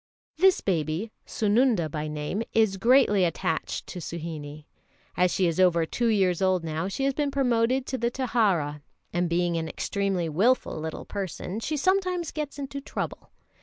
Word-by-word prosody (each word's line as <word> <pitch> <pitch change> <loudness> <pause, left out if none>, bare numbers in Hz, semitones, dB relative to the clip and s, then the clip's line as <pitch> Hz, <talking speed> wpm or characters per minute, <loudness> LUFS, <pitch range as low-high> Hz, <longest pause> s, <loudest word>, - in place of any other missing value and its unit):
This 375 +2 +4
baby, 170 +3 -1 0.2
Sununda 215 -4 +2
by 150 0 -4
name, 150 +7 -3
is 220 -4 +3
greatly 230 -3 +4
attached 165 -1 -1
to 180 - -7
Suhinie. 155 -3 -6 0.5
As 180 0 +3
she 185 +1 +1
is 170 0 0
over 170 -3 +4
two 235 +8 -1
years 190 -5 +2
old 185 -2 +2
now, 160 +2 -2
she 200 +7 -3
has 275 0 +2
been 290 +1 0
promoted 255 -1 +1
to 260 -1 -3
the 235 - +1
Taraha, 205 - 0 0.3
and 175 0 0
being 170 0 +1
an 160 -1 -3
extremely 195 -4 -1
wilful 195 +4 +1
little 160 0 -5
person, 195 0 -4
she 300 +7 -2
sometimes 365 0 +1
gets 300 -2 -5
into 280 0 -5
trouble. - - -5
195 Hz, 165 wpm, -26 LUFS, 165-255 Hz, 0.5 s, This